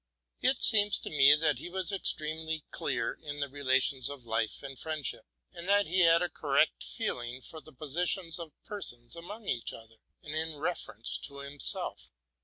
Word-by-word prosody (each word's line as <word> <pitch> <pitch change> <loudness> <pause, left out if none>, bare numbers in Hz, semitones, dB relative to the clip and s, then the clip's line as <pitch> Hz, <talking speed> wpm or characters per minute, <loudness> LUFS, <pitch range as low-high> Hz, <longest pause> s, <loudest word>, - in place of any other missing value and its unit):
It 260 +1 +3
seems 210 -2 +7
to - - -7
me 145 -1 +7
that 150 -1 +1
he - - -7
was 190 +1 -3
extremely 160 -4 0
clear - - -2
in 145 -1 -6
the 140 - -1
relations 135 -2 +1
of 140 -4 -9
life 115 +1 -2
and 135 -2 -7
friendship, 150 -8 -3 0.3
and 175 +1 -7
that 205 0 +4
he 185 +4 0
had 170 -1 +6
a - - +1
correct 145 +1 +1
feeling 125 - -3
for 155 +4 -8
the 155 - -15
positions 165 +5 -1
of 165 -2 -7
per 205 -1 -6
sons 120 -2 -2
among 200 +6 -9
each 120 -2 -1
other, 115 0 -13 0.3
and 150 - -6 0.2
with 145 - -11
reference 145 - -3
to 140 -1 -7
himself. 140 0 0
150 Hz, 180 wpm, -30 LUFS, 135-175 Hz, 0.3 s, seems